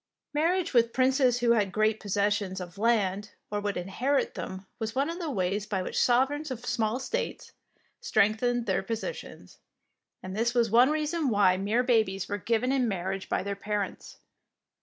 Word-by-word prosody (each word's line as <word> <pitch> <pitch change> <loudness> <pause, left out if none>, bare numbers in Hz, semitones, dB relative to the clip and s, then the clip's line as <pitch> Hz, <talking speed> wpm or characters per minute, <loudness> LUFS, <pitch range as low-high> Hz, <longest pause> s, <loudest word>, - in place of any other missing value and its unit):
Marriage 340 +4 +1
with 235 -1 +3
princes 255 -1 +3
who 240 -1 +3
had 210 -5 +2
great 215 +2 +1
possessions 200 -1 -1
of 180 +1 -9
land 210 -3 +1 0.2
or 205 - -1
would 205 -1 -2
inherit 245 +10 -1
them 190 0 -6
was 220 +1 -4
one 280 +5 +1
of 340 - -7
the 335 -3 -3
ways 195 -2 -1
by 190 -3 -1
which - - -1
sovereigns 270 +5 +2
of 245 -2 -6
small 225 +2 0
states 470 - -4 0.5
strengthened 245 - +1
their 190 -2 0
posi 225 - -3
tions, - - -12 0.6
and 185 +1 -6
this 235 +3 0
was 235 -3 +2
one 245 +4 +6
reason 305 0 0
why 200 -4 +4
mere 210 +6 +1
babies 220 -6 +1
were 205 - -3
given 235 +5 0
in 260 -3 +2
marriage 190 -1 -3
by - - 0
their 200 0 -3
parents. 205 -1 -4
225 Hz, 175 wpm, -28 LUFS, 200-255 Hz, 0.6 s, one